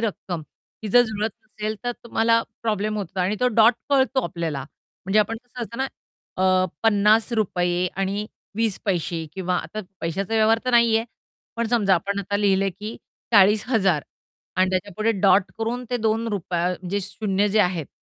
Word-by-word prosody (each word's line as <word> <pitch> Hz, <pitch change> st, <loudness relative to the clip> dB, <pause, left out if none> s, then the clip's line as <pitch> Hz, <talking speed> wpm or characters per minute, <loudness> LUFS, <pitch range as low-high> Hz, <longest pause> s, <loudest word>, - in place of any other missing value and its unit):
रक्कम 190 Hz, -6 st, -3 dB, 0.4 s
ही 215 Hz, -, -4 dB
जर 245 Hz, +2 st, +7 dB
जुळत 215 Hz, 0 st, -2 dB
नसेल 215 Hz, 0 st, -4 dB
तर 245 Hz, -, 0 dB
तुम्हाला 230 Hz, 0 st, +2 dB, 0.2 s
प्रॉब्लेम 215 Hz, -1 st, -1 dB
होतो 190 Hz, -1 st, -4 dB
आणि 195 Hz, +4 st, 0 dB
तो 250 Hz, -, +4 dB
डॉट 225 Hz, +1 st, +7 dB, 0.2 s
कळतो 265 Hz, -1 st, +3 dB
आपल्याला. 160 Hz, -6 st, -3 dB, 0.4 s
म्हणजे 195 Hz, +3 st, +2 dB
आपण 225 Hz, +2 st, -1 dB
कसं 245 Hz, 0 st, -8 dB
असतं 235 Hz, +2 st, -7 dB
ना 265 Hz, -, +1 dB, 0.6 s
अ, 185 Hz, 0 st, +4 dB, 0.2 s
₹50 205 Hz, -4 st, +2 dB
आणि 195 Hz, +2 st, -1 dB, 0.3 s
20 225 Hz, -4 st, 0 dB
पैसे 170 Hz, -4 st, -1 dB
किंवा 180 Hz, -1 st, -1 dB
आता 175 Hz, +7 st, -4 dB, 0.2 s
पैशाचा 190 Hz, +6 st, -2 dB
व्यवहार 220 Hz, +1 st, +4 dB
तर 255 Hz, -, +1 dB
नाहीये. 230 Hz, -1 st, +4 dB, 0.5 s
पण 235 Hz, -1 st, 0 dB
समजा 205 Hz, -5 st, +3 dB
आपण 200 Hz, +4 st, -2 dB
आता 200 Hz, +1 st, -1 dB
लिहिलंय 195 Hz, -1 st, +2 dB
की 210 Hz, +5 st, -7 dB, 0.4 s
₹40,000 200 Hz, -, +4 dB, 0.5 s
आणि 185 Hz, 0 st, +3 dB
त्याच्यापुढे 205 Hz, +4 st, 0 dB
डॉट 190 Hz, -1 st, +4 dB
करून 240 Hz, +3 st, -2 dB
ते 245 Hz, -, +1 dB
₹2 215 Hz, -6 st, -1 dB
म्हणजे 185 Hz, +2 st, -3 dB
शून्य 200 Hz, +1 st, -1 dB
जे 215 Hz, +1 st, +3 dB
आहेत 180 Hz, -5 st, 0 dB
205 Hz, 155 wpm, -23 LUFS, 185-225 Hz, 0.6 s, जर